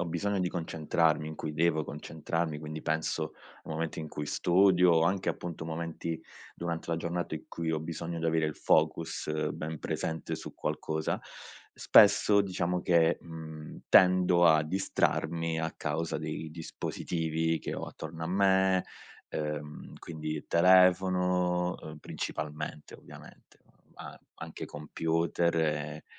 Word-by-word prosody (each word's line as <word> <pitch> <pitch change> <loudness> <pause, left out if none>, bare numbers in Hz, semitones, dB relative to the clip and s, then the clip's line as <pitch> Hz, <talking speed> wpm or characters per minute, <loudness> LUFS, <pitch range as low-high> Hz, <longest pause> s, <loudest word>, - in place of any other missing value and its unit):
ho - - 0
bisogno 100 +4 -1
di 90 - +1
concentrarmi, 80 -2 0
in 80 - -6
cui 75 0 -5
devo 80 0 +2
concentrarmi, 80 +1 -3
quindi 75 0 -6
penso 80 0 -1 0.3
a - - -13
momenti 80 +1 -3
in 80 - -4
cui 75 - -5
studio, 90 0 +4
anche 95 +3 +1
appunto 85 -2 -4
momenti 80 0 -4 0.4
durante 85 -1 -4
la 85 - +1
giornata 85 0 -3
in 80 - -7
cui 85 -1 -3
ho 80 - -1
bisogno 85 +1 -5
di 80 - -3
avere 80 -1 +2
il 75 - -3
focus 80 0 +1
ben 80 0 -5
presente 80 0 -3
su - - -9
qualcosa, 80 +1 -2 0.5
spesso 100 0 +6
diciamo 90 -2 -1
che, 85 -1 +3
mhmm, 80 -2 -9
tendo 90 -1 +6
a 80 -2 +6
distrarmi 85 -1 0
a 80 0 -2
causa 80 +2 -2
dei 80 - -5
dispositivi 80 0 -2
che - - -5
ho - - -4
attorno 80 0 -8
a - - -2
me, 95 0 +3 0.5
uhm, 75 -1 -5
quindi 80 -2 -6
il 75 - -8
telefono, 90 0 +4
uhm, 75 0 -9
principalmente, 75 0 -5
ovviamente, - - -15 0.4
ma - - -9 0.2
anche - - -7
computer 85 +3 -1
e 75 -1 -1
80 Hz, 135 wpm, -30 LUFS, 80-90 Hz, 0.5 s, spesso